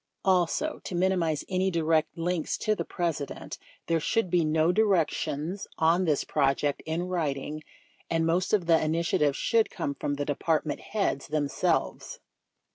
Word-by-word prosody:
Also, 190 - +1
to 180 - -5
minimize 175 -4 +1
any 185 +1 +1
direct 160 -2 +1
links 170 -1 -1
to 215 - +1
the - - -2
President, 165 -6 -4 0.3
there 165 -1 +1
should 185 +3 0
be 175 -2 +3
no 155 +2 +2
directions 180 -3 0
on 170 +3 +3
this 150 -4 +1
project 140 0 +1
in 160 +2 -1
writing, 155 -4 -2 0.5
and 165 0 +1
most 175 +3 +1
of 205 -5 +2
the 165 -1 +4
initiative 155 -3 +1
should 225 +5 +2
come 140 - -3
from 145 +1 -3
the 145 0 -2
Department 155 +1 0
Heads 200 -10 -2
them 150 -1 0
selves. - - -1
165 Hz, 150 wpm, -28 LUFS, 150-180 Hz, 0.5 s, the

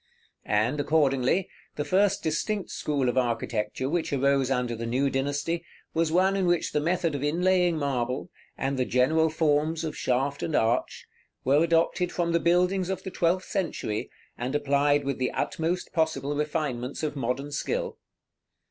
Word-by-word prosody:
And, 110 +7 +1
accordingly, 145 +2 +2 0.3
the 150 - -2
first 195 +4 +2
distinct 180 +6 -1
school 140 -4 -1
of 125 +1 +2
architecture 115 0 -1
which 165 +3 -1
arose 140 -1 +2
under 125 -3 0
the 115 +1 -4
new 135 +4 +1
dynasty, 145 +5 -1 0.3
was 165 -1 +1
one 190 +3 +3
in 190 -2 +1
which 175 -1 +1
the - - +1
method 170 +1 0
of 140 - -3
inlaying 175 +2 +2
marble, 130 -4 -2 0.3
and 135 0 -1
the 125 - +2
general 155 +7 +3
forms 155 0 +1
of 160 - -3
shaft 135 +3 0
and 160 - -1
arch, 115 +3 0 0.4
were 140 +5 +4
adopted 170 +2 +2
from 170 -1 -1
the 170 - +3
buildings 180 +2 +2
of 190 - -3
the 190 - -5
twelfth 180 +2 +1
century, 140 - -2 0.3
and 125 +3 -2
applied 145 0 +2
with 140 -2 -2
the 130 - +1
utmost 170 +3 -2
possible 145 -3 0
refinements 145 -3 -2
of 150 -1 -2
modern 135 +2 -2
skill. 480 - -2
150 Hz, 160 wpm, -27 LUFS, 135-170 Hz, 0.4 s, were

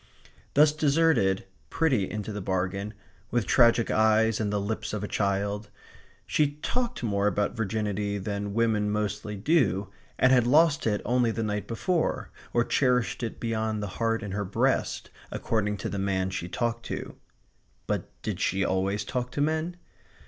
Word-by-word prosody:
Thus 150 +1 +7
deserted, 145 - +2 0.2
pretty 130 - +1
into 105 0 -4
the 105 - -4
bargain, 95 +3 -2 0.3
with 120 -3 0
tragic 115 +3 +4
eyes 110 0 +3
and 105 -2 0
the 105 - 0
lips 110 +2 -3
of 105 -1 -3
a - - -2
child, 100 +1 -1 0.6
she 145 -2 +1
talked 245 - -2
more 100 -2 +1
about 105 0 0
virginity 105 -2 -1
than 100 +1 -3
women 110 -3 +2
mostly 105 0 -2
do; 105 - +2 0.3
and 130 - +4
had 125 -2 +4
lost 150 0 +4
it 105 -2 0
only 125 -1 +2
the 115 0 -2
night 105 -1 -2
before, 160 +9 -1 0.2
or 120 - +3
cherished 125 -1 +1
it 115 - -4
beyond 110 -2 -1
the 100 +2 -7
heart 115 0 +1
in 100 - -5
her 100 +2 -2
breast, 95 0 0 0.2
according 105 -2 -1
to - - -4
the 100 - -3
man 95 -1 0
she 85 -2 -4
talked 115 +3 -2
to. - - -5 0.7
But - - -2
did - - -3
she 95 +1 +1
always 95 +2 0
talk 125 +2 -2
to - - -3
men? 160 +3 0
110 Hz, 165 wpm, -27 LUFS, 100-120 Hz, 0.7 s, Thus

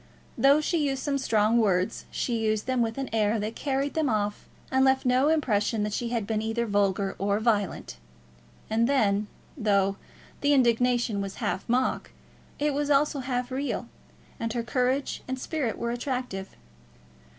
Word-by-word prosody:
Though 280 +3 +5
she 335 +2 0
used 270 -1 -3
some 280 -2 0
strong 225 -2 +2
words, 195 -1 +1
she 235 -2 -2
used 215 -1 0
them 255 -1 0
with 225 +1 -1
an 270 -1 -2
air 215 0 +2
that 215 +2 -3
carried 275 0 -1
them 315 -4 +1
off 210 -2 -1 0.2
and 265 0 +3
left 265 0 +3
no 255 +3 +3
impression 225 -8 +1
that 210 0 -2
she 235 +2 -2
had 230 -3 -1
been 215 0 -1
either 225 +2 -1
vulgar 200 -2 +1
or 200 +1 +1
violent. 210 - -1 0.7
And 230 +3 +1
then, 210 -6 +2 0.3
though 200 -6 +1 0.4
the 290 0 +3
indignation 240 -4 +2
was 195 -1 -5
half 190 - -3
mock, 255 +2 0 0.5
it 295 0 0
was 290 +1 -1
also 290 0 +3
half 250 -1 -2
real, 270 +2 -3 0.5
and 230 0 -2
her 235 -1 -1
courage 255 +3 0
and 260 0 -3
spirit 265 -3 -2
were 235 0 -2
attractive. 245 -6 -4
235 Hz, 165 wpm, -27 LUFS, 210-265 Hz, 0.7 s, Though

